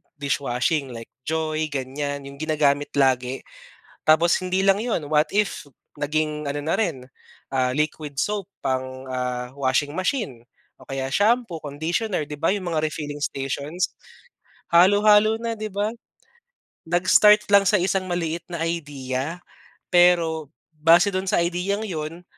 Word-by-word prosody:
dishwashing 140 -1 -1
like 115 0 -9 0.2
Joy 155 0 -1
ganyan, 140 +1 -4
yung 140 0 -11
ginagamit 145 -2 +1
lagi 130 -2 +1 0.6
tapos 165 +2 +5
hindi 185 +1 0
lang 195 0 +4
yun. 225 -6 -1
What 150 +1 +2
if 210 -5 0 0.3
naging 150 0 -1
ano 145 +1 -3
na 160 - 0
rin, 135 - -2 0.4
ah, 130 -1 0
liquid 150 -1 -2
soap 205 -2 -1 0.2
pang, 130 0 -3
ah, 125 -1 -3
washing 140 +4 0
machine 185 - -2 0.3
o - - -17
kaya 135 -1 -3
shampoo, 215 - +2
conditioner 160 +6 -2
'di 150 - -6
ba, 165 +5 +1
yung 185 -4 -3
mga 155 0 +1
refilling 150 -1 -4
stations 140 +6 -2 0.8
halo-halo 210 +4 +5
na 230 -1 -3
'di 215 0 -4
ba? 205 +1 0 1.0
Nag-start 200 +4 +5
lang 200 -1 +6
sa 210 - +4
isang 185 0 0
maliit 170 -1 -2
na 170 -2 -3
idea 145 -2 -3 0.5
pero 170 -4 +4 0.2
base 165 +5 +4
dun 185 0 -2
sa - - +2
ideang 185 +5 -1
yun, 165 -1 -5
155 Hz, 135 wpm, -23 LUFS, 140-185 Hz, 1.0 s, lang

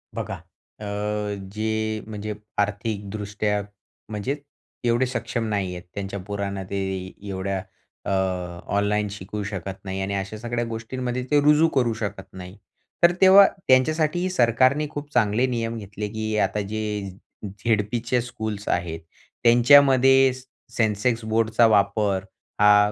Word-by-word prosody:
बघा. - - -4 0.4
अ, - - -9 0.7
जे 110 0 -1
म्हणजे 105 0 -5 0.2
आर्थिकदृष्ट्या, 105 0 -2 0.5
म्हणजे 110 +6 -2 0.5
एवढे 120 +2 +3
सक्षम 120 -2 -3
नाही 100 -3 -1
आहेत, 90 - -8
त्यांच्या 100 0 -5
पोरांना 100 -1 -3
ते 100 - -3 0.5
एवढ्या 95 0 -2 0.4
अ, - - -3 0.6
ऑनलाईन 105 +1 +1
शिकवू 105 +1 -6
शकत 95 -2 -5
नाही 95 0 -3
आणि 95 +1 -2
अशा 95 +2 -4
सगळ्या 120 +1 -2
गोष्टींमध्ये 125 +2 -4
ते 145 - +5
रुजू 150 +2 +5
करू 120 -3 +2
शकत 100 -3 -4
नाही. 90 +1 -10 0.5
तर 170 - +8
तेव्हा 195 +1 +9 0.2
त्यांच्यासाठी 155 +7 +3
सरकारने 130 0 +3
खूप 145 -1 -7
चांगले 115 +1 +3
नियम 115 -2 -2
घेतले, 105 0 -5
की 110 0 -3
आता 100 +2 -2
जे 105 -2 -3 0.4
झेडपीचे 115 +4 0
स्कूल्स 110 -4 -5
आहेत, 85 -2 -1 0.4
त्यांच्यामध्ये 135 +2 +6
से 130 - -10 0.3
सेन्सेक्स 115 +1 +1
बोर्डचा 115 +1 +3
वापर 100 -2 +2 0.4
हा 105 0 +6
110 Hz, 125 wpm, -24 LUFS, 100-125 Hz, 0.7 s, तेव्हा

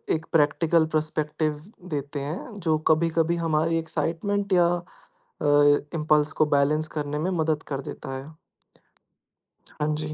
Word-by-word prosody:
एक 160 +1 -5
practical 160 +1 +3
perspective 155 0 -1 0.3
देते 145 -1 -3
हैं, 155 - -5
जो 165 -6 0
कभी-कभी 165 +1 +2
हमारी 165 0 +1
एक्साइटमेंट 185 +5 -2
या 175 -1 +5 0.8
अ, - - -2 0.5
इम्पल्स 150 -1 +2
को - - +7
बैलेंस 150 +2 +2
करने 150 0 -2
में 180 +4 -1
मदद 160 -1 0
कर 140 -1 -3
देता 135 - -8
है। 140 +4 -9 1.5
हाँ 150 +1 0
जी। 155 0 -4
155 Hz, 130 wpm, -25 LUFS, 150-165 Hz, 1.5 s, को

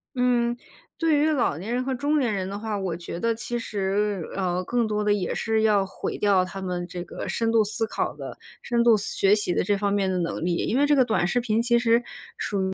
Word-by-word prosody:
嗯， 240 -1 +2 0.4
对 320 -3 +3
于 295 - +3
老 245 - +1
年 210 +7 -4
人 250 +1 0
和 265 0 -2
中 290 +4 +1
年 240 -5 +1
人 190 -2 -2
的 200 +1 -5
话， 220 -2 -3
我 185 -4 -2
觉 170 0 -6
得 230 0 +1
其 240 +2 -4
实， 200 -3 -1
呃， 185 -1 -1
更 235 +3 0
多 210 0 -1
地 210 - +2
也 200 -3 0
是 220 -1 0
要 205 -3 +4
毁 195 - -5
掉 195 -3 +3
他 195 +1 -7
们 180 -1 -3
这 175 -1 -6
个 - - -7
深 230 -1 0
度 225 -1 +4
思 220 +2 -2
考 - - -2
的、 - - -8 0.2
深 235 -1 +1
度 235 -2 +6
思 205 - -2
学 195 +1 +4
习 205 -4 +1
的 - - +2
这 205 +2 +1
方 200 0 0
面 195 -2 +1
的 180 - 0
能 165 0 -2
力。 175 -1 +1
因 245 - +1
为 290 - +4
这 295 0 +4
个 260 - +5
短 220 -7 +1
视 245 +7 +1
频 225 -2 0
其 235 0 +3
实 235 0 +3 0.3
属 - - -3 0.2
于 - - -3
210 Hz, 275 characters per minute, -25 LUFS, 190-235 Hz, 0.4 s, 度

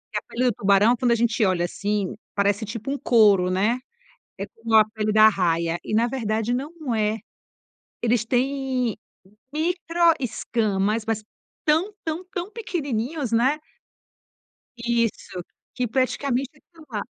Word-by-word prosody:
A - - 0
pele 250 +2 -1
do 245 - +3
tubarão 200 +4 +4
quando 245 0 +1
a - - +5
gente 230 -1 +1
olha 180 -2 +1
assim 205 +2 -2 0.2
parece 200 +2 +1
tipo 230 +5 -5
um 285 - -1
couro, 205 -8 +4
né. 205 +7 +1 0.6
É - - -4
como 225 0 -5
a 215 -1 +8
pele 215 -1 0
da 215 0 +6
arraia, 170 -4 +1
e - - -3
na 230 +2 +4
verdade 225 -2 -1
não 290 0 -4
é. 215 0 +1 0.8
Eles 235 -1 +2
têm 255 -1 0 0.6
micro 335 +1 +2
escamas, 220 -4 -1
mas 225 -1 -1 0.4
tão 325 +7 +2
tão 325 +3 -3
tão 355 +2 -4
pequenininhos, 290 - -3
né. 260 +7 +2 1.2
Isso 235 -6 -1 0.3
que 250 -1 0
praticamente 265 +3 -1
não 325 -1 -15
da 215 -4 -3
235 Hz, 140 wpm, -24 LUFS, 210-270 Hz, 1.2 s, a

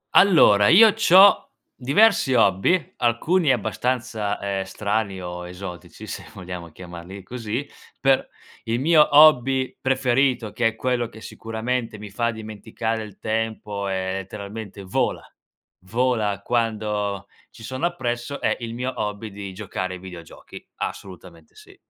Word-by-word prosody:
Allora, 105 - +6
io 215 - +7
c'ho 200 -2 +6 0.3
diversi 140 - +3
hobby, 110 - +2
alcuni 140 +7 +2
abbastanza, 110 -2 -2
ehm, 100 -1 -2
strani 100 0 -2
o 90 0 -6
esotici 90 -2 -9
se - - -7
vogliamo 90 -2 -7
chiamarli 90 +3 -10
così, 120 +5 -5 0.3
per 135 -1 +2 0.4
il 115 +1 -1
mio 155 +2 +5
hobby 135 -3 +5
preferito, 130 -3 +1
che 120 -2 +1
è 115 - -2
quello 120 0 -1
che 110 - -13
sicuramente 115 +1 -4
mi 105 -1 -10
fa 115 +3 0
dimenticare 110 0 -4
il 105 -2 -10
tempo 110 -2 -3
e 95 -1 -2
letteralmente 100 +1 -7
vola, 95 - -2 0.6
vola 110 -3 0
quando 105 -4 -1 0.2
ci 115 - -15
sono 130 +8 -2
appresso, 125 -4 -4
è - - +1
il 115 -1 -6
mio 125 +2 -3
hobby 105 0 -4
di 100 -1 -7
giocare 95 -2 -5
ai - - -10
videogiochi, 90 -3 -11
assolutamente 90 -4 -8
sì. - - -16
110 Hz, 130 wpm, -23 LUFS, 100-125 Hz, 0.6 s, io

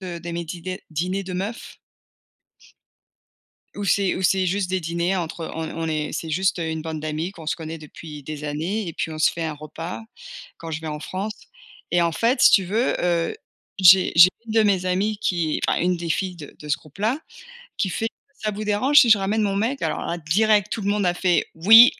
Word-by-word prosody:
de 180 -2 -6
de 170 +1 -7
mes 170 0 -3
dîders 180 +3 -6
dîners 185 +5 -2
de 185 - -6
meufs 200 +6 -5 2.0
où 205 - -4
c'est 195 0 +2
où 185 - -4
c'est 190 0 +3
juste 185 0 -1
des 185 - 0
dîners 170 +3 -1
entre 165 -2 -4
on 160 0 -3
on 165 0 -3
est 155 -1 -2
c'est 165 - -4
juste 185 +4 +1
une 160 -1 -2
bande 160 -1 -5
d'amies 155 +3 -3
qu'on 160 -5 -12
se - - 0
connaît 160 0 -6
depuis 150 0 -10
des 150 +1 -7
années 170 +7 -2
et - - -5
puis 160 - -3
on 155 - -6
se 155 - +4
fait 170 - -5
un 160 - -2
repas 155 +6 -7 0.5
quand 165 -1 -8
je 155 - -3
vais 160 - -7
en 150 -1 -4
France 200 +6 -4 0.6
et 175 - +4
en 170 - +2
fait, 240 +8 +1
si - - +9
tu 195 - +5
veux, 220 +8 0
heu, 170 -1 +1 0.4
j'ai 185 0 +7
j'ai 170 +2 +10 0.2
une 220 - -5
de 225 0 +4
mes 190 -3 +2
amies 200 +3 0
qui 170 -7 0
enfin, - - +2
une 180 +1 +1
des 170 0 -5
filles 185 +1 -1
de 150 -4 -11
de 150 - -10
ce 145 - +2
groupe-là 210 - -3 0.6
qui 190 - 0
fait: 225 +5 -1 0.3
«Ça 215 - 0
vous 210 +1 -5
dérange 210 +8 +2
si 240 - +5
je 215 - +8
ramène 210 +3 0
mon 195 -1 0
mec?», 230 +7 0
alors - - -1
là, 170 - -2
direct, 205 +5 +2
tout 220 - -2
le 195 - -1
monde 205 -1 +1
a 175 - +2
fait: 180 -1 +2
«Oui! 225 +9 +9
180 Hz, 225 wpm, -23 LUFS, 160-200 Hz, 2.0 s, j'ai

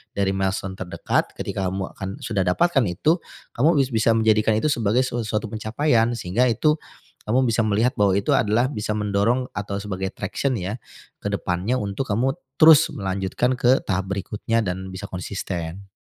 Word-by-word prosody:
dari 100 -1 +1
milestone 95 0 -2
terdekat, 90 -2 -1
ketika 95 -1 -3
kamu 95 0 -4
akan 95 0 -6
sudah 100 -4 0
dapatkan 145 - +3
itu, 150 - +1 0.4
kamu 150 +6 +3
bis 130 - -4
bisa 115 +1 +3
menjadikan 110 -1 +3
itu 155 - +1
sebagai 115 0 +2
su 120 -1 -3
suatu 110 0 -1
pencapaian, 115 +2 +1
sehingga 105 +6 +1
itu 150 +7 +2 0.5
kamu 125 +5 +3
bisa 115 0 +2
melihat 110 +4 +2
bahwa 100 -2 +4
itu 100 - 0
adalah 110 +3 +2
bisa 105 -3 -2
mendorong 105 +5 +1
atau 100 0 -4
sebagai 95 -2 -3
traction, 115 +6 -2
ya, 100 +4 -4 0.4
ke - - -3
depannya 90 +8 -1
untuk 100 +6 -3
kamu 120 +6 +1 0.3
terus 160 -1 +8
melanjutkan 95 +4 -1
ke 125 +2 +4
tahap 95 0 -1
berikutnya 105 +3 -1
dan 95 0 -3
bisa 95 +2 -7
konsisten. 90 0 -5
105 Hz, 165 wpm, -23 LUFS, 95-120 Hz, 0.5 s, terus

